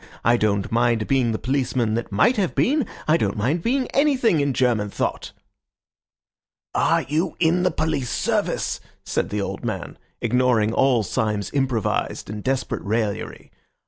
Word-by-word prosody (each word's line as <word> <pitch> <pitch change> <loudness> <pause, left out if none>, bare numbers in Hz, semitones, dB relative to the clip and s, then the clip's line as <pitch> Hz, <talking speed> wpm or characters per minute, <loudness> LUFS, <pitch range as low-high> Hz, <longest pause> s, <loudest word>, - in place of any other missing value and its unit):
I 120 - +5
don't 100 -4 0
mind 115 -1 +2
being 130 -4 +2
the 110 - -1
policeman 125 -3 0
that 115 0 -3
might 220 - +3
have 195 -4 0
been. 285 0 +2 0.2
I 155 +2 +4
don't 100 -9 -1
mind 135 +11 0
being 255 +6 +1
anything 265 - +2
in 140 -1 +1
German 120 -5 +1
thought." - - -3 1.4
"Are - - +2
you 160 +4 -1
in 175 +1 +3
the 180 - +3
police 155 -6 -1
service?" - - -1 0.3
said - - -1
the 105 0 -2
old - - -5
man, - - -5 0.2
ignoring 120 -2 +2
all 125 -4 +3
Syme's 105 -1 -1
improvised 130 -7 -1
and 105 -1 -6
desperate 130 -1 -1
raillery. 105 -1 -3
125 Hz, 150 wpm, -23 LUFS, 110-160 Hz, 1.4 s, I